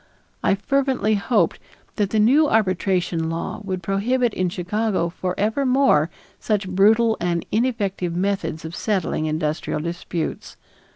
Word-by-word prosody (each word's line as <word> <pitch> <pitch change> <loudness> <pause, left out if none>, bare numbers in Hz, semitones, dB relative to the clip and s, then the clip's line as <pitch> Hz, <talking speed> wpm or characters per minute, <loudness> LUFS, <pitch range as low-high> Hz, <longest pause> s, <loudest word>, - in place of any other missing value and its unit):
I - - +3
fervently 260 0 +1
hoped 215 +3 +1 0.4
that 205 -3 +1
the 220 - -1
new 275 +8 +5
arbitration 185 -5 +1
law 165 +5 -4
would 185 -3 -4
prohibit 230 +6 +1
in 185 -1 0
Chicago 185 +1 -1
forever 200 +9 -1
more 255 - +3 0.3
such 210 -3 -1
brutal 220 +5 +4
and 170 -1 -1
ineffective 205 -7 -1
methods 180 -4 -2
of 160 +2 -6
settling 185 -6 -1
industrial 155 0 -2
disputes. 170 0 -4
195 Hz, 125 wpm, -22 LUFS, 170-220 Hz, 0.4 s, new